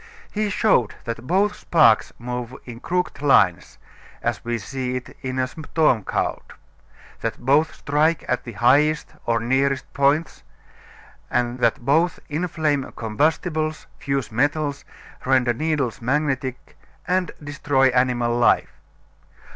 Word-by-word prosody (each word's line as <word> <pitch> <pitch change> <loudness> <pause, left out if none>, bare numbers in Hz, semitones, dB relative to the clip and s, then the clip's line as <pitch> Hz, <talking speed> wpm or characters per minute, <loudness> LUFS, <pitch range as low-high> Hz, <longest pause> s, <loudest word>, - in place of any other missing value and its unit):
He 215 0 -1
showed 185 - +2
that 115 +1 -6
both 200 +4 +2
sparks 120 - +3
move 125 +1 -5
in 120 -2 -9
crooked 180 +1 -2
lines 100 -11 +3 0.5
as - - -2
we 120 0 -2
see 125 +3 -4
it 125 0 -6
in 130 -1 -4
a 130 - +2
storm 145 -3 0
cloud, - - -1 0.8
that - - -3
both 145 +5 +2
strike 155 +3 +1 0.2
the 120 - -8
highest 145 +8 +2
or 115 -1 +2
nearest 130 +3 0
points, 140 +4 +1 0.9
that 120 -1 0
both 160 +5 +2
inflame 155 -3 -1
combustibles, 155 - -1
fuse 135 -3 -2
metals, 145 +4 0 0.4
render 130 -2 +2
needles 145 -4 -1
magnetic 135 0 -2 0.3
and 180 0 +1
destroy 145 -2 +2
animal 125 -2 +1
life. 120 0 +3
135 Hz, 115 wpm, -22 LUFS, 120-155 Hz, 0.9 s, sparks